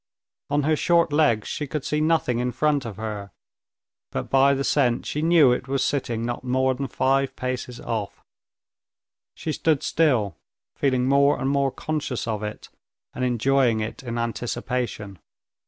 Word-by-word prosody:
On 145 0 +1
her 155 +2 +2
short 170 -1 +2
legs 130 -9 +2
she 150 - -3
could 150 0 -4
see 150 0 0
nothing 155 -7 +1
in 125 0 0
front 145 +1 +1
of 110 -4 -6
her, 105 -2 -5 0.8
but - - -5
by 135 +1 +5
the 135 - -1
scent 125 -4 +1
she 150 - -2
knew 160 -5 +5
it 125 +1 -1
was 135 0 0
sitting 120 -5 -1
not 120 +1 -4
more 130 +1 +1
than 135 +2 -4
five 135 +2 +1
paces 125 -1 -4
off. 110 -3 -4 1.1
She 160 - -4
stood 155 -2 +1
still, 120 - +1 0.4
feeling 130 -2 +1
more 140 +1 +4
and 135 - 0
more 140 -1 +2
conscious 145 -4 -3
of 110 -2 -2
it, 105 0 -6 0.4
and 125 - -4
enjoying 125 -1 +2
it 110 - -4
in 120 -2 -5
anticipation. 120 -3 -3
130 Hz, 160 wpm, -24 LUFS, 120-145 Hz, 1.1 s, by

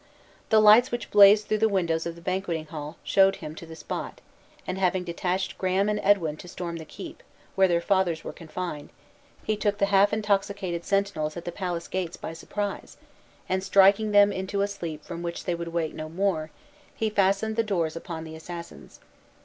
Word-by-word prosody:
The 220 - +6
lights 215 +4 +7
which 240 0 -5
blazed 205 +1 +7
through 215 - 0
the 220 0 +3
windows 170 -5 0
of 170 - -5
the 170 - -13
banqueting 185 -4 -2
hall 150 0 -7
showed 195 0 +4
him 150 - -8
to 165 +1 -10
the 160 - -9
spot; 160 - -6 0.5
and, 185 +1 -4
having 185 -1 +1
detached 180 +2 -2
Graham 190 +2 +1
and 210 0 0
Edwin 170 -7 +2
to 180 - -11
storm 175 -1 -5
the 160 - -8
keep, - - -10 0.3
where 190 -1 +4
their 170 -1 +2
fathers 180 -3 +1
were - - -6
confined, 165 -2 -6 0.5
he 215 - 0
took 205 -1 0
the 200 - +3
half 195 +1 +5
intoxicated 200 -4 -1
sentinels 195 -6 -1
at 170 - -7
the 175 - -3
palace 175 -2 -4
gates 180 -2 -3
by - - -6
surprise, 200 +4 -5 0.5
and 185 0 -1
striking 195 +2 +5
them 205 0 +6
into 190 +1 -2
a - - +1
sleep 170 -7 -6
from 170 -1 -6
which 170 0 -5
they 175 - 0
would 170 0 -4
wake 165 -2 -2
no 155 0 -6
more, 165 -3 -1 0.5
he 220 -1 -1
fastened 200 +2 +1
the 230 - +3
doors 175 -8 -1
upon 165 -1 -6
the 160 0 -9
assassins. 170 +1 -10
185 Hz, 195 wpm, -26 LUFS, 170-200 Hz, 0.5 s, lights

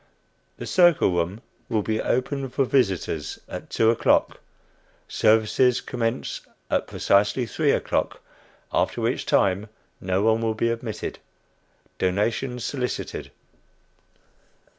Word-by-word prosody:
The - - -6
circle 175 - +4
room 90 +5 -1 0.3
will 110 -3 0
be 110 +1 -1
open 135 +2 -1
for 135 +2 +1
visitors 95 - 0
at - - -8
two 115 0 +3
o'clock; 115 - +2 0.7
services 110 +3 +3
commence 115 0 -3 0.3
at - - +1
precisely 100 +5 +2
three 110 - 0
o'clock, - - -1 0.5
after - - +1
which - - -1
time 100 +3 +2 0.3
no 95 +1 0
one 110 +1 +3
will 110 -1 0
be 115 +1 +1
admitted. 115 -2 -5 0.8
Donations 115 +6 -1
solicited." 125 -3 -4
115 Hz, 110 wpm, -24 LUFS, 100-125 Hz, 0.8 s, circle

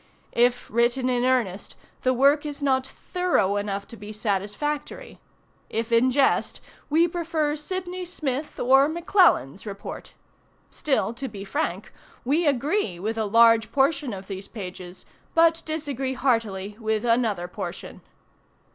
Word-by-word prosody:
"If 245 +1 +2
written 240 +3 +2
in 245 0 +1
earnest, 230 -7 0 0.3
the 255 - +2
work 280 +4 +4
is 295 -1 -6
not 265 -1 +1
thorough 360 - 0
enough 200 -1 -3
to - - -9
be 210 -1 -9
satisfactory; 215 - -3 0.5
if 225 +1 -3
in 230 +3 +4
jest, 270 +1 +2 0.3
we 325 +3 +4
prefer 325 -3 -1
Sydney 365 +3 -4
Smith 300 -5 -4
or 270 +3 +5
McClellan's 335 - +2
Report. 200 -1 -8 0.6
Still, 270 -5 0
to 265 +3 -5
be 200 -4 -8
frank, 190 0 -3 0.3
we 305 +6 +2
agree 280 - 0
with 215 +4 -2
a 220 -1 -1
large 230 +1 +5
portion 280 -1 +1
of 195 -1 -7
these 195 0 -6
pages, 185 -3 -9 0.3
but 330 0 +4
disagree 280 -4 -3
heartily 215 -6 -1
with 220 0 -1
another 230 -7 +1
portion." 180 - -7
250 Hz, 135 wpm, -25 LUFS, 210-295 Hz, 0.6 s, or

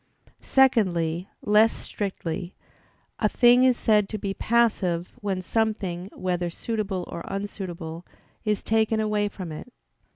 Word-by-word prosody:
Secondly, 185 -10 +2
less 215 +2 +5
strictly, 185 -3 -5 0.6
a - - +2
thing 245 0 +5
is 255 -2 +4
said 210 -2 +3
to 215 - -3
be 195 -1 -3
passive, 195 -7 +1
when 195 -3 -2
something, 195 -3 -1
whether 180 -1 -1
suitable 195 -1 -3
or 170 - -6
unsuitable, 180 -4 -5 0.4
is 210 -2 0
taken 220 0 +2
away 210 -1 +1
from 185 -4 -7
it. 155 +11 -8
200 Hz, 125 wpm, -25 LUFS, 175-220 Hz, 0.6 s, less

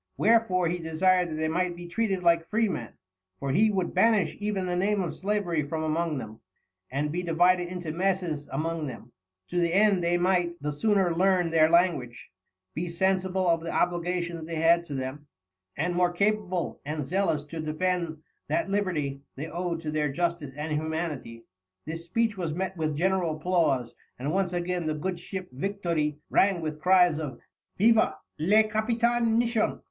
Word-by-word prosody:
Wherefore, 215 -6 +3
he 175 +2 -1
desired 170 0 +1
they 160 0 0
might 175 +2 0
be 175 0 -9
treated 195 0 -1
like 170 -1 +3
Freemen 210 - -1 0.5
(for 140 - -2
he 215 +9 +4
wou'd 190 -4 -1
banish 215 -8 +3
even 205 -3 -1
the 180 -1 -1
Name 200 +3 +1
of 175 -4 -2
Slavery 190 -5 -1
from 155 +2 -3
among 160 0 0
them) 110 -3 -7 0.5
and 145 +3 -1
be 175 +3 -2
divided 175 +1 +3
into 175 -3 -5
Messes 175 -4 -1
among 160 +2 -2
them, 120 -1 -9 0.4
to 175 - 0
the 170 -1 +2
end 200 -3 +4
they 175 +1 +2
might 175 -1 +1
the 150 +1 -2
sooner 190 +1 +2
learn 180 -1 +2
their 160 -1 +5
language, 165 - +1 0.4
be 175 +3 -3
sensible 185 +1 0
of 165 -1 +3
the 165 - -5
Obligations 175 -1 -1
they 165 - -4
had 165 +2 +4
to 145 - -6
them, 135 +3 -5 0.5
and 175 +4 0
more 175 0 +2
capable 200 -1 -1
and 150 0 -3
zealous 175 -2 0
to 160 +2 -8
defend 160 0 -2 0.2
that 335 -11 -1
Liberty 155 -9 -1
they 140 - -5
owed 170 0 -3
to 155 -2 -3
their 150 -2 0
Justice 170 -3 -2
and 150 +1 -3
Humanity." 155 -6 -3 0.4
This 165 +2 -6
speech 225 +4 0
was 165 -4 -2
met 190 +1 -3
with 155 -3 -1
general 180 -2 +1
applause, 155 -7 +1 0.2
and 140 +4 -2
once 190 0 0
again 175 -1 -2
the 155 - 0
good 180 +3 -3
ship 185 +1 -6
Victoire 170 0 -1 0.2
rang 195 -2 +3
with 155 -2 -5
cries 180 -3 +4
of 150 -4 -5 0.4
"Vive 225 +3 +5 0.4
le 205 +8 +5
Capitaine 230 +1 +1
Misson!" 235 -2 +1
175 Hz, 170 wpm, -27 LUFS, 155-190 Hz, 0.5 s, their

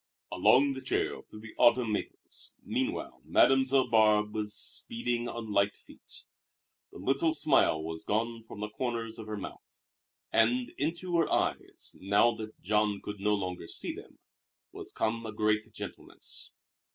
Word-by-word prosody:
Along 140 +2 +4
the 135 - -7
trail - - -1
through 105 - -11
the 110 0 -10
autumn 120 -1 +5
maples, 105 - -6
meanwhile - - -3
Mademoiselle 135 0 +4
Barbe 105 -1 +4
was 105 -1 -3
speeding 120 - -2
on 115 -2 -6
light 100 0 +2
feet. - - -14 0.7
The - - -11
little 155 +4 +1
smile 105 - +3
was 80 0 -5
gone 115 +2 -1
from 105 - -9
the 105 - -3
corners 115 -2 -3
of 110 - -8
her 105 -1 -4
mouth, 100 - -7 0.7
and 120 +2 +2
into 170 +4 -1
her 165 - +2
eyes, - - -2
now 100 +5 +4
that 110 0 -8
Jean 105 0 +1
could 105 -1 -6
no 105 +1 +2
longer 90 -4 -4
see - - -3
them, - - -12 0.5
was - - -9
come 115 +1 -1
a 110 - -5
great 110 +1 0
gentleness. - - -8
110 Hz, 150 wpm, -30 LUFS, 105-125 Hz, 0.7 s, autumn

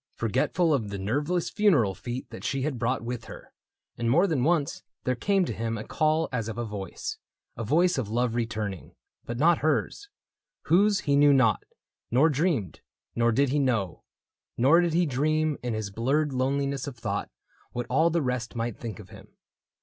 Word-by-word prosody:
Forgetful 135 - +1
of 115 -7 -1
the 100 - -4
nerveless 145 - -1
funeral 155 - +3
feet 120 +7 -6
That - - -9
she 135 -1 -1
had 140 -4 -2
brought 120 0 0
with 120 -1 -5
her; - - -12 0.5
and 120 -1 0
more 165 +10 +4
than 155 -9 0
once 155 -1 +1 0.2
There 130 - +1
came 195 +9 +1
to - - -3
him 115 0 -3
a 110 - -5
call 155 +4 +1
as 115 -4 -2
of 115 - -6
a 120 - -2
voice 100 -4 -6 0.2
— - - -56
A 115 - -4
voice 165 - +2
of 110 -5 -3
love 120 +1 0
returning 110 -5 -4
— - - -45
but 120 - -4
not 165 +5 +4
hers. 155 - -1 0.5
Whose 200 +3 +3
he 140 -2 +1
knew 145 0 +6
not, 130 -5 +3 0.5
nor 135 +7 +4
dreamed; 145 - -1 0.3
nor 120 0 +3
did 140 +4 +2
he 145 +3 +1
know. 115 - -1 0.5
Nor 145 +8 +5
did 170 -2 0
he 175 +1 +3
dream, 155 +2 0
in 120 -2 -2
his 110 -2 -4
blurred 135 +7 0
loneliness 140 +2 -1
Of 135 -4 -7
thought, 105 -3 -3 0.4
what 120 0 -3
all 160 +7 +3
the 170 -2 0
rest 125 -2 -3
might 115 -1 -3
think 110 -6 -6
of - - -12
him. - - -13
130 Hz, 195 wpm, -27 LUFS, 115-155 Hz, 0.5 s, knew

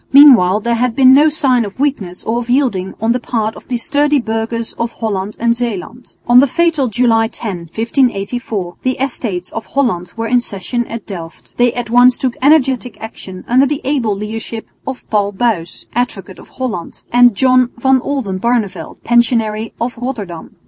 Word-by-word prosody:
Meanwhile 240 -9 +7
there 235 +2 0
had 235 0 0
been 260 -1 +6
no 295 +3 +6
signs 260 -5 +2
of 200 - -12
weakness 220 -11 -2
or 230 +2 -1
of 240 0 -7
yielding 240 -8 0
on 225 +2 +1
the 250 - +1
part 220 -2 -2
of - - -14
the 250 - -1
sturdy 285 +4 +2
burghers 225 0 -2
of 230 0 -2
Holland 205 -2 -3
and 235 0 +2
Zeeland. 235 0 -5
On 240 +1 +6
the 280 - +5
fatal 325 -2 +1
July 225 -1 +2
10, 185 -8 -6
1584, 225 -5 -1
the 255 0 -1
Estates 225 -9 -3
of 225 - -6
Holland 225 -11 -1
were 225 - -2
in 245 +2 +3
session 240 +2 -3
at 230 -2 -7
Delft. 165 -5 -9
They 245 0 +3
at 240 -2 -5
once 245 +1 +5
took 255 -2 -2
energetic 265 -4 +2
action 190 -4 -9
under 260 +3 +4
the 295 0 -2
able 255 -7 0
leadership 220 +2 -6 0.2
of 265 -1 -6
Paul 205 -1 +1
Buys, 190 -6 -2
Advocate 200 -6 -3
of - - -14
Holland, 235 -10 -5
and 245 -2 +6
John 255 +1 +3
van 265 +2 +3
Oldenbarneveldt, 235 -4 -2
Pensionary 225 -2 +1
of 235 0 -3
Rotterdam. 210 -10 -6
235 Hz, 175 wpm, -15 LUFS, 210-255 Hz, 0.2 s, Meanwhile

